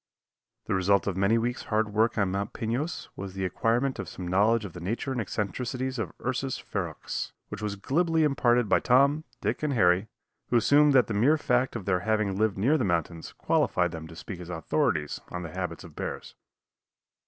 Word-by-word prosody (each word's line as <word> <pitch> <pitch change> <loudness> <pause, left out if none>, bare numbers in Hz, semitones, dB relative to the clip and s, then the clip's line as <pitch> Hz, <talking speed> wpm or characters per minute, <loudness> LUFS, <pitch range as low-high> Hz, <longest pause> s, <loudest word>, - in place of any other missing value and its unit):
The - - -1
result 95 +1 +3
of 100 - -1
many 100 +4 +3
weeks' 120 +2 -2
hard 110 -1 0
work 110 +2 +2
on 100 -3 +1
Mount 100 +1 -3
Pinos 125 +9 -3
was 95 -1 -7
the 95 0 -2
acquirement 120 +8 0
of - - -4
some 90 - -7
knowledge 105 +5 +3
of 95 - -8
the 85 - -8
nature 110 +9 -3
and 125 -3 -1
eccentricities 125 +6 -3
of 95 -8 -3
Ursus 130 +1 -1
ferox, - - -4 0.2
which 105 0 -6
was 105 -1 -2
glibly 160 - +1
imparted 125 -5 +3
by 95 - +4
Tom, 140 +5 +3 0.2
Dick - - -1
and 150 -2 0
Harry, 95 -2 +3 0.4
who 120 - +4
assumed 145 +5 +5
that 130 -2 +6
the 115 - -4
mere 130 +10 +4
fact 125 -3 +1
of 110 -6 -5
their 90 -2 +2
having 110 0 0
lived 105 0 +1
near 135 +11 +3
the - - +1
mountains 85 -3 -2
qualified 90 -1 +1
them 80 -1 -7
to 80 - -12
speak 90 +2 -7
as 90 -1 -9
authorities 85 - -1
on 90 0 -5
the 85 - -7
habits - - -4
of - - -13
bears. - - -5
110 Hz, 200 wpm, -28 LUFS, 95-130 Hz, 0.4 s, that